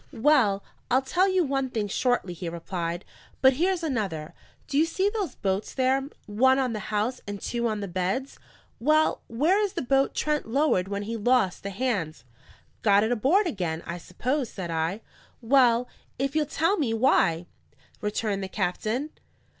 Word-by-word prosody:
"Well, 225 Hz, -6 st, +3 dB, 0.3 s
I'll 260 Hz, +2 st, +3 dB
tell 360 Hz, +8 st, +2 dB
you 375 Hz, -1 st, +3 dB
one 270 Hz, -2 st, -1 dB
thing 220 Hz, -4 st, -2 dB
shortly," 225 Hz, -3 st, 0 dB
he 175 Hz, 0 st, -5 dB
replied. 170 Hz, +1 st, -4 dB, 0.3 s
"But 265 Hz, 0 st, +6 dB
here's 350 Hz, +5 st, 0 dB
another. 200 Hz, -, -2 dB, 0.3 s
Do 280 Hz, -, 0 dB
you 320 Hz, -, +5 dB
see 380 Hz, +4 st, 0 dB
those 405 Hz, -, -3 dB
boats 195 Hz, 0 st, -2 dB
there, 265 Hz, +1 st, +1 dB, 0.2 s
one 260 Hz, +6 st, +3 dB
on 255 Hz, -3 st, 0 dB
the 215 Hz, -, -3 dB
house 220 Hz, +4 st, -1 dB
and 205 Hz, 0 st, -5 dB
two 235 Hz, +2 st, -2 dB
on 215 Hz, -2 st, -2 dB
the 200 Hz, -, -3 dB
beds? 185 Hz, +9 st, -2 dB, 0.4 s
Well, 310 Hz, +5 st, +3 dB
where 310 Hz, -, +2 dB
is 405 Hz, -, -1 dB
the -, -, -3 dB
boat 270 Hz, +2 st, +2 dB
Trent 300 Hz, -4 st, 0 dB
lowered 235 Hz, -7 st, +2 dB
when 200 Hz, +1 st, -3 dB
he 225 Hz, +3 st, -4 dB
lost 225 Hz, -4 st, +2 dB
the 200 Hz, -, -4 dB
hands?" 195 Hz, -, -2 dB, 0.6 s
"Got 205 Hz, -1 st, +4 dB
it 220 Hz, -, 0 dB
aboard 275 Hz, -, +3 dB
again, 175 Hz, -, -2 dB
I 170 Hz, +1 st, -5 dB
suppose," 255 Hz, -, -2 dB
said 175 Hz, -4 st, -6 dB
I. 165 Hz, +6 st, -1 dB, 0.4 s
"Well, 245 Hz, -1 st, +4 dB, 0.3 s
if 275 Hz, +2 st, -2 dB
you'll 305 Hz, -2 st, +2 dB
tell 330 Hz, +7 st, +1 dB
me 240 Hz, -8 st, 0 dB
why!" 180 Hz, -8 st, +3 dB, 0.6 s
returned 210 Hz, -1 st, -1 dB
the 190 Hz, -, -3 dB
captain. 215 Hz, +10 st, -2 dB
235 Hz, 170 wpm, -26 LUFS, 195-275 Hz, 0.6 s, But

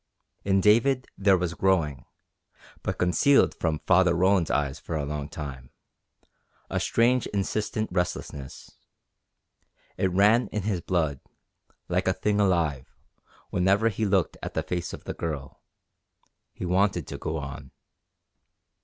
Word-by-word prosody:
In 95 Hz, -1 st, +2 dB
David 120 Hz, +6 st, +3 dB
there 100 Hz, -1 st, +4 dB
was 90 Hz, -1 st, -2 dB
growing 85 Hz, -7 st, 0 dB, 0.8 s
but -, -, -3 dB
concealed 90 Hz, +11 st, +4 dB
from 80 Hz, -2 st, -2 dB
Father 90 Hz, -1 st, +4 dB
Roland's 95 Hz, -1 st, +3 dB
eyes 70 Hz, -2 st, -1 dB
for 80 Hz, -, -5 dB
a 75 Hz, -2 st, -1 dB
long 75 Hz, 0 st, -4 dB
time 65 Hz, -4 st, -7 dB, 1.0 s
a -, -, 0 dB
strange 125 Hz, +2 st, +2 dB
insistent 105 Hz, +2 st, -2 dB
restlessness. 90 Hz, -6 st, -4 dB, 1.3 s
It 95 Hz, -, +3 dB
ran 105 Hz, +6 st, +4 dB
in 105 Hz, -, -4 dB
his 100 Hz, -4 st, -1 dB
blood, 80 Hz, -6 st, -1 dB, 0.7 s
like 90 Hz, +2 st, 0 dB
a 95 Hz, -, +3 dB
thing 105 Hz, +2 st, 0 dB
alive, 85 Hz, -9 st, 0 dB, 0.6 s
whenever 100 Hz, +5 st, +3 dB
he 110 Hz, +1 st, -2 dB
looked 95 Hz, -3 st, +1 dB
at -, -, -6 dB
the -, -, 0 dB
face 90 Hz, -1 st, -3 dB
of -, -, -9 dB
the -, -, -5 dB
Girl. 75 Hz, -5 st, -5 dB, 0.9 s
He -, -, -7 dB
wanted 95 Hz, +3 st, +1 dB
to -, -, -7 dB
go 80 Hz, -, -3 dB
on. 70 Hz, -2 st, -7 dB
90 Hz, 135 wpm, -26 LUFS, 80-100 Hz, 1.3 s, there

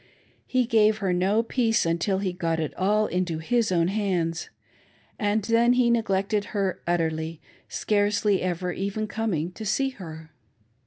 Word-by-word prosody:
He 255 Hz, -1 st, +2 dB
gave 215 Hz, -2 st, +3 dB
her 195 Hz, -4 st, 0 dB
no 195 Hz, +5 st, +2 dB
peace 230 Hz, -3 st, +1 dB
until 170 Hz, +4 st, 0 dB
he 190 Hz, -2 st, -2 dB
got 165 Hz, -2 st, -1 dB
it 155 Hz, -, -2 dB
all 210 Hz, +3 st, +2 dB
into 180 Hz, -4 st, -1 dB
his 225 Hz, +7 st, 0 dB
own 170 Hz, -2 st, +2 dB
hands, 180 Hz, -5 st, -1 dB, 0.7 s
and 210 Hz, -1 st, +1 dB
then 230 Hz, +3 st, +4 dB
he 250 Hz, -1 st, +3 dB
neglected 205 Hz, -2 st, +1 dB
her 195 Hz, -2 st, -1 dB
utterly; 160 Hz, -2 st, -1 dB, 0.3 s
scarcely 205 Hz, -1 st, +1 dB
ever 180 Hz, 0 st, -2 dB
even 200 Hz, +4 st, -3 dB
coming 210 Hz, -7 st, -2 dB
to 220 Hz, -, -9 dB
see 270 Hz, +6 st, +1 dB
her. 160 Hz, -9 st, -10 dB
195 Hz, 150 wpm, -25 LUFS, 175-220 Hz, 0.7 s, then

